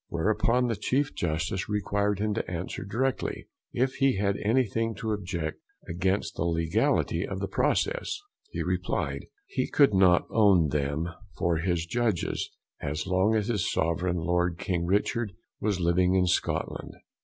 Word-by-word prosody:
whereupon 110 +8 +1
the 115 - 0
Chief 135 +7 0
Justice 85 +4 -2
required 100 0 0
him 105 +1 0
to 110 - -3
answer 90 +1 -4
directly, 125 +7 -2 0.2
if 130 +2 +1
he 135 -6 +3
had 100 0 +1
anything 115 0 +1
to 110 -2 -3
object 90 -6 -3 0.3
against 95 +4 -1
the - - -1
Legality 85 - +1
of - - -4
the - - -2
Process; - - 0 0.3
he - - -3
replyed, - - -2 0.2
he 395 0 -2
could 140 -7 +5
not 95 -2 +5
own 100 -8 +5
them 75 +3 -1 0.3
for 85 -1 +1
his 85 0 0
judges, 110 0 -1 0.3
as 75 +1 -2
long 95 +4 +2
as 105 -1 +1
his 105 -6 0
Sovereign 85 +2 0
Lord 85 +1 0
King 85 -2 -1
Richard 105 +2 0 0.3
was 100 -3 0
living 90 +2 +3
in 90 -1 +4
Scotland. 90 - -1
95 Hz, 150 wpm, -28 LUFS, 85-110 Hz, 0.3 s, could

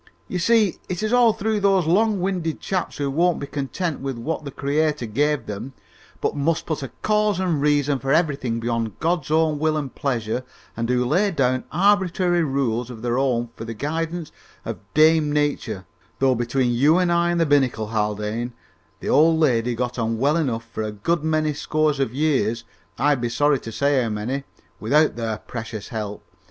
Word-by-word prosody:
"You 180 - -3
see, 215 +1 +3
it 180 +3 -3
is 215 +2 0
all 245 -2 +6
through 215 0 -1
those 195 -3 +3
long 205 +5 +2
winded 180 -4 -1
chaps, 185 -2 -3
who 140 -1 -1
won't 170 +4 +2
be - - -4
content 145 +4 -3
with 135 -2 -4
what 155 +7 -3
the 140 - -5
Creator 150 0 0
gives 145 +7 0
them, 110 +6 -6 0.5
but - - 0
must 155 +3 0
put 155 -2 -3
a 135 - -4 0.2
cause 210 -2 +2
and 175 -6 0
reason 145 -1 +2
for 135 +3 -2
everything 140 -7 +1
beyond 115 -2 -2
God's 165 -4 0
own 155 -1 +2
will 155 0 +1
and 140 -4 -4
pleasure, 125 -3 -2 0.3
and 115 +1 -2
who 125 0 +2
lay 185 +11 +2
down 130 -7 0
arbitrary 185 -1 +2
rules 125 -5 -1
of 115 -2 -9
their 120 +1 0
own 120 -3 0
for - - -7
the 115 0 -6
guidance 165 +5 -3 0.3
of - - -4 0.2
Dame 155 -1 +5
Nature, 145 -10 -1 0.3
though, 135 -1 +3
between 120 +1 0
you 145 +8 +4
and 180 -1 +2
I 170 0 +2
and 175 0 +1
the 165 - +3
binnacle, 130 -7 +1
Haldane, 105 +2 -2 0.5
the - - -4
old 160 +1 +5
lady 120 -5 +2
got 125 +1 -3
on 115 0 0
well 140 +6 +2
enough 125 -8 -1
for - - -4
a 110 0 -2
good 150 +11 -1
many 155 -1 +1
scores 150 0 0
of 135 -5 0
years 130 -6 0 0.3
I'd 140 0 +2
be 120 - -1
sorry 145 +3 +2
to 115 - -8
say 140 +3 +2
how 115 - -1
many 120 +6 -3 0.3
without 150 +2 +3
their 115 -2 -2
precious 110 -2 -7
help! 105 -3 -5
145 Hz, 190 wpm, -23 LUFS, 120-165 Hz, 0.5 s, all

